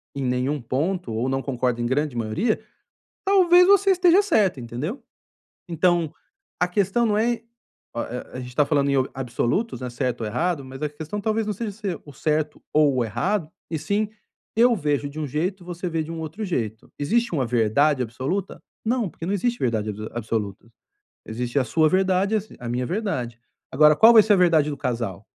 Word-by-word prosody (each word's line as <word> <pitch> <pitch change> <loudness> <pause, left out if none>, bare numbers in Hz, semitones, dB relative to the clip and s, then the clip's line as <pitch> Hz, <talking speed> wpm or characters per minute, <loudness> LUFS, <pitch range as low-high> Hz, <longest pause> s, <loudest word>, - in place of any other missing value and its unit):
em 140 - -3
nenhum 130 +3 -1
ponto 140 +3 -2
ou 115 +4 -1
não 135 0 0
concorda 125 -3 -1
em - - -1
grande 140 +2 0
maioria, 120 - 0 0.7
talvez 360 -2 +6
você 395 0 +5
esteja 360 0 +5
certo, 200 - +2
entendeu? 140 - -5 0.7
Então, 170 -1 +1 0.5
a 180 - +4
questão 200 +5 +1
não 210 -2 +1
é 235 +2 +2
o 230 0 -20 0.5
a 125 +2 -6
a - - -5
gente 125 -1 -8
tá 150 - +4
falando 140 -2 +1
em - - +2 0.2
absolutos, 130 - -1
né, 125 - -4
certo 125 -1 -2
ou 110 - -2
errado, 150 +7 -1
mas 135 0 -10
a 150 - -1
questão 155 +7 -6
talvez 220 +1 0
não 210 - -1
seja 215 +1 -4
ser 200 -4 -5
o 145 - -12
certo 150 +2 -1
ou 150 -3 +4
o 125 - +2
errado 155 - -1 0.2
e 160 - -1
sim: 205 +7 -1 0.5
"Eu 235 +2 +5
vejo 145 -5 -1
de 150 +2 -8
um 155 - -2
jeito 175 +7 -2
e - - -16
você 175 0 -4
vê 165 -1 -1
de 160 - -7
um 165 - -5
outro 160 +7 -5
jeito". 110 - -3
Existe 230 +9 +1
uma 135 -5 +1
verdade 125 +5 +2
absoluta? 135 - -4 0.2
Não, 235 -3 0
porque 165 - -8
não 190 - -1
existe 235 +5 0
verdade 110 -3 0
abso 105 +1 -6
absoluta. 110 -3 -3 0.6
Existe 120 +4 -1
a - - +2
sua 155 +6 +3
verdade, 190 +3 +2
a 215 - +1
si 215 - -15
a 120 -2 -6
minha 125 +1 -1
verdade. 170 - -3 0.3
Agora 150 +3 +6
qual 225 +7 +7
vai 220 -2 +8
ser 215 - +4
a - - +6
verdade 165 -5 +4
do 145 - -5
casal? 115 -9 -3
155 Hz, 200 wpm, -24 LUFS, 125-200 Hz, 0.7 s, vai